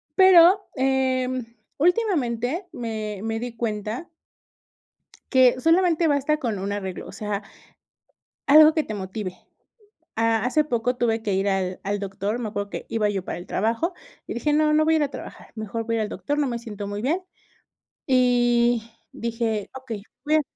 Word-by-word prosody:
Pero, 375 +1 +7
em, 260 -2 0 0.3
últimamente 330 - +1
me 220 - -5
me 225 0 -2
di 245 -1 -6
cuenta 220 +5 -3 1.2
que 255 -2 +5
solamente 335 +1 +3
basta 290 +1 +2
con 230 -8 -2
un 195 +2 -3
arreglo, 190 -3 -5
o - - -9
sea 210 -1 -3 1.1
algo 310 +2 +8
que 315 - +1
te 215 - -5
motive, 190 -1 -5 0.8
ah, 225 0 +2
hace 300 +4 +2
poco 245 -2 -1
tuve 225 -2 0
que 205 -4 -1
ir 195 +1 0
al 190 -1 -1
al 205 +1 -1
doctor, 200 +3 -3
me 230 -3 -3
acuerdo 205 -1 -4
que - - -6
iba 215 -2 +1
yo 195 -2 -2
para - - -5
el 175 - -9
trabajo, 230 - 0 0.3
y - - -5
dije: 295 +5 0
"No, 305 0 +3
no 310 0 +4
voy 320 - +4
a - - +4
ir 310 - +2
a 285 - 0
trabajar, - - -10
mejor 220 +1 -4
voy 230 0 -1
a - - 0
ir - - +1
al - - -4
doctor, 290 +6 -3
no 295 - +2
me 240 -2 -2
siento 210 -4 -7
muy 205 +1 -4
bien", 325 +9 0 0.9
y 240 -2 +3 0.2
dije: 225 -3 -2
"Okey, 240 -6 -6 0.2
voy 305 +1 +3
a" - - +3
235 Hz, 180 wpm, -24 LUFS, 210-290 Hz, 1.2 s, algo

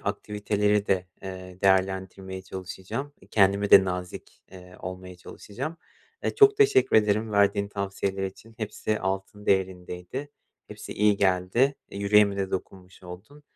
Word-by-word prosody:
aktiviteleri 105 0 0
de, 95 -1 +1 0.2
eee, 95 -1 -8
değerlendirmeye 95 0 0
çalışacağım. 95 +9 -6
Eee, - - -20
kendime 100 0 +3
de 95 - +9
nazik, 90 -1 -6
eee, 90 -1 -13
olmaya 90 0 -8
çalışacağım. 125 - -7 0.5
Eee, - - -1
çok 415 -1 +6
teşekkür 410 - +4
ederim 105 +1 +2
verdiğin 100 0 +2
tavsiyeler 100 -1 -3
için, 110 +4 -9
hepsi 110 -1 -3
altın 95 +2 -4
değerindeydi. 95 +7 -2 0.4
Hepsi - - -8
iyi 105 0 +3
geldi. 95 +8 +2 0.2
Eee, 100 - -7
yüreğime 100 0 +4
de 95 -1 -2
dokunmuş 95 0 -7
oldun. 95 +12 -12
100 Hz, 135 wpm, -26 LUFS, 95-105 Hz, 0.5 s, de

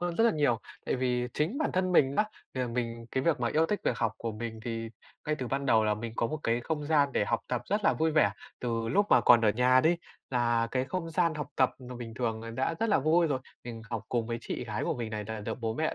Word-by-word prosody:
hơn 175 -1 -2
rất 225 - +4
là 235 - +6
nhiều. 140 -7 +2 0.3
Tại - - 0
vì 125 -1 0
chính 175 - 0
bản 310 - 0
thân 185 0 +1
mình 140 -5 +4
á, 210 - +4 0.3
thì 130 - -2
là 125 - 0
mình 115 -1 -3
cái 130 - 0
việc 155 -6 +1
mà 120 - +1
yêu 160 +5 +2
thích 210 +4 -1
việc - - 0
học 115 -3 +1
của 115 -1 -3
mình 110 0 -6
thì 115 -1 -3 0.4
ngay 155 - +1
từ 130 - -3
ban 140 +2 -1
đầu 110 -4 +4
là 105 0 +2
mình 110 +1 -6
có 115 - +1
một 155 +5 -4
cái 115 +1 +1
không 150 +3 -3
gian 145 -3 +3
để 105 - +2
học 115 - 0
tập 125 -1 -1
rất 205 0 -1
là - - +5
vui 160 0 +1
vẻ, 150 -9 +4 0.3
từ 115 -2 -1
lúc 200 - +3
mà - - +7
còn 120 -1 +7
ở 110 - +3
nhà 125 +3 +4
đi, 165 +5 +3 0.3
là 120 -2 +1
cái 130 0 0
không 165 +4 -4
gian 170 -1 +2
học 150 -2 -4
tập 130 -2 +4 0.2
mà 125 - -7
bình 115 -2 -7
thường 115 -2 -2
là 115 - -6
đã 130 +7 -1
rất 225 - +1
là 205 - +4
vui 160 +4 +3
rồi. 140 -4 0 0.3
Mình 115 -2 -7
học 115 -2 -3
cùng 115 -2 0
với 115 0 -3
chị - - -4
gái - - -3
của - - 0
mình 115 -3 -4
này, 105 -1 -4
là 110 -1 -5
được 105 - -4
bố 110 -1 -1
mẹ 160 +3 -1
125 Hz, 290 wpm, -29 LUFS, 115-155 Hz, 0.4 s, mà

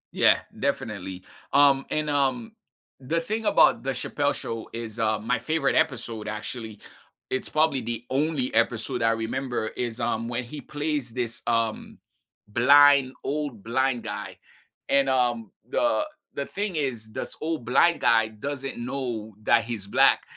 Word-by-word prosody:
Yeah, - - +4 0.2
definitely, 105 -9 -3 0.3
um 140 -1 +5
and, 155 0 -1
um, 145 - 0 0.5
the 145 +6 -1
thing 215 +6 -3
about - - +5
the 135 - 0
Chappelle 145 +3 -1
Show 115 -1 -5
is, 115 -1 -6
uh, 110 -1 +2
my 115 +3 0
favorite 140 +3 0
episode 115 -4 0
actually, 110 0 -5 0.5
it's 130 - -2
probably 155 -3 +2
the 115 0 -4
only 140 -1 0
episode 120 +2 0
I 115 0 +4
remember 115 0 -2
is, 120 -1 -4
um, 115 +1 -1
when 120 +1 -2
he 135 +5 -8
plays 145 -4 -3
this, 120 -1 -3
um, 115 -1 -1 0.5
blind 140 +3 +6
old 140 -7 -3
blind 125 +1 0
guy, - - -6 0.5
and, 140 -1 +3
um, 120 -5 +1 0.2
the 300 - +2 0.3
the 140 - -3
thing 200 -1 -3
is 120 -7 -3
this - - -5
old 155 -5 -2
blind 170 +8 +4
guy 115 -1 +4
doesn't 135 +5 -5
know 120 -3 -4
that 115 +1 +4
he's 115 -4 -5
black, - - +4
125 Hz, 145 wpm, -26 LUFS, 115-140 Hz, 0.5 s, blind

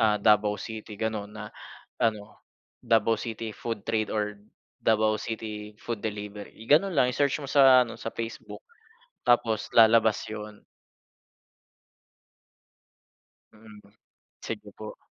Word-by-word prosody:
ah, 110 -1 +4
Davao 105 0 +3
City 110 0 -8
ganon 110 -2 -3
na 105 -1 -8 0.5
ano, 105 -3 -1 0.4
Davao 115 -1 +2
City 115 -1 -5
Food 115 -2 -5
Trade 110 -1 0
or 105 -1 -3 0.4
Davao 110 -1 +2
City 105 -1 -6
Food 115 -1 -5
Delivery. 105 -1 -6
I 110 - -12
ganon 165 +6 +3
lang 125 -1 +3
i-search 140 +2 0
mo 135 - -6
sa 130 -3 +7
ano 115 - -10
sa - - -4
Facebook, 115 0 -7 0.6
tapos 120 -3 +2
lalabas 110 -1 +6
yun. 105 -1 -8 2.9
Mm, 110 -1 -15 0.6
sige 105 -2 -6
po. 110 0 -8
110 Hz, 120 wpm, -27 LUFS, 105-115 Hz, 2.9 s, sa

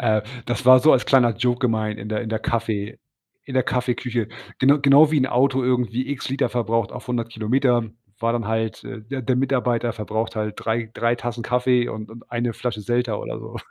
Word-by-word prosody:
äh, 110 -3 +2 0.2
das 120 +1 -2
war 130 0 +9
so 155 - +6
als 130 - +2
kleiner 120 -4 +4
Joke 125 0 +1
gemeint 110 -3 0
in 105 - -7
der 110 +1 -2
in 110 - -6
der 110 0 -1
Kaffee 110 -3 -2 0.5
in 135 - -8
der 130 - +3
Kaffeeküche. 125 -2 -1 0.3
Gena 140 +3 +5
genau 145 +2 +6
wie 155 - +3
'n 130 - +2
Auto 130 +1 +2
irgendwie 125 +1 0
x 140 - -4
Liter 135 +1 0
verbraucht 115 -2 -1
auf - - -9
100 120 -2 -2
Kilometer, 120 +2 +1 0.3
war 115 0 0
dann 115 -3 -2
halt, 110 0 -2
äh 110 - -8
der 130 +4 -5
der 125 +2 +1
Mitarbeiter 125 -3 0
verbraucht 110 +1 -3
halt 105 -1 -2
3, 110 0 -2
3 115 0 +1
Tassen 120 -1 -5
Kaffee 125 0 +2
und 110 0 -7
und 115 +1 -14
1 120 0 -1
Flasche 115 -4 -4
Selter 120 -1 -1
oder - - -6
so. - - -9
120 Hz, 210 wpm, -22 LUFS, 110-130 Hz, 0.5 s, war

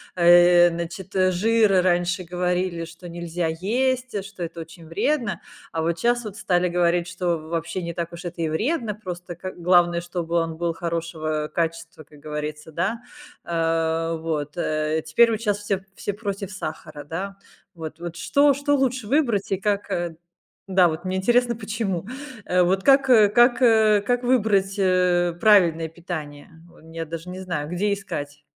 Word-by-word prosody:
Э, 175 0 +7
значит, 170 +3 -6
э, 185 0 +4
жир 210 0 +3
раньше 180 0 +1
говорили, 180 -1 -1
что 170 +2 -11
нельзя 170 0 -3
есть, 250 +9 -1
э, 200 - -1
что 200 -1 -11
это 165 0 -6
очень 165 0 -12
вредно. 230 - -1 0.3
А 160 - -1
вот 165 0 -1
щас 240 0 +1
вот 210 -2 -8
стали 180 -3 +1
говорить, 175 0 +1
что 175 -1 -1
в 155 0 -11
вообще 170 +2 -3
не 170 0 -4
так 170 0 -4
уж 170 +1 -8
это 175 -1 -6
и 165 - +1
вредно. 225 - -1
Просто 180 -4 -7
ка 185 +2 -6 0.3
главное, 170 0 -3
чтобы 170 -1 -4
он 165 -1 0
был 170 0 -1
хорошего 160 -2 -3
качества, 165 -1 -3
как 150 0 -18
говорится, 150 +1 -6
да. 210 +9 -2 0.4
Э, 165 0 0
вот, 150 -2 -3
э, 155 -1 0
теперь 230 +9 +4
вот 220 -1 -2
щас 205 -3 0
все 200 -2 -2
все 205 - -3
против 200 -2 -5
сахара, 155 -5 -7
да. 195 +6 -5 0.4
Вот, 160 -2 -8
вот 170 -1 -6
что, 285 +9 +3
что 285 +1 +1
лучше 255 -4 0
выбрать 235 -8 +1
и 195 - +2
как, 205 0 -1
э 175 -1 -2 0.5
да, 185 -2 +5
вот 160 +1 -4
мне 185 0 -1
интересно, 240 +4 +2
почему? 205 -5 -3 0.4
Э, 180 0 +2
вот 190 +2 +1
как, 275 -1 +5
э, 215 -5 +7
как, 240 +4 +4
э, 220 -4 +5
как 245 0 0
выбрать, 210 -6 +2
э, 180 -2 +2
правильное 175 -7 +5
питание? 155 -4 -7 0.2
Вон 160 -1 -17
я 165 0 -5
даже 165 +2 -7
не 185 +1 -7
знаю, 170 -5 -4
где 200 +4 0
искать. 145 -7 -6
175 Hz, 175 wpm, -23 LUFS, 165-205 Hz, 0.5 s, Э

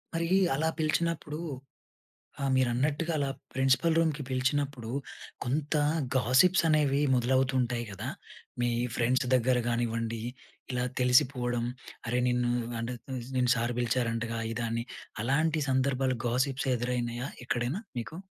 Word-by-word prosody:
మరి 165 0 0 0.3
అలా 160 +4 +1
పిలిచినప్పుడు 155 -1 0 1.0
ఆ! - - -1
మీరన్నట్టుగా 140 +6 +1
అలా 140 -2 0 0.2
ప్రిన్సిపల్ 135 +5 +3
రూమ్‌కి 155 -3 +1
పిలిచినప్పుడు 130 -2 -1 0.5
కొంత 145 +5 -1 0.4
గాసిప్స్ 130 +10 +5
అనేవి 145 -2 +3
మొదలవుతూ 130 +2 +2
ఉంటాయి 120 -1 -1
కదా! 95 - -5 0.5
మీ 120 - +2 0.3
ఫ్రెండ్స్ 125 +2 +2
దగ్గర 125 +1 +3
కానివ్వండి, 115 -1 -1 0.5
ఇలా 125 0 0 0.2
తెలిసిపోవడం, 125 -2 +3 0.4
"అరే 125 +2 +1
నిన్ను 125 0 +1 0.3
అంటే 120 +1 -3 0.2
నిన్ను 130 +1 -2
అంటే 125 - +5
సార్ 120 +1 0
పిలిచారంటగా", 115 -1 0
ఇదని 115 0 -2 0.4
అలాంటి 155 +5 +2
సందర్భాలు 130 -1 +1
గాసిప్స్ 130 +3 0
ఎదురైనాయా 120 0 -2 0.2
ఎక్కడైనా 125 - -1 0.2
మీకు? 155 +7 -6
130 Hz, 115 wpm, -29 LUFS, 120-140 Hz, 1.0 s, గాసిప్స్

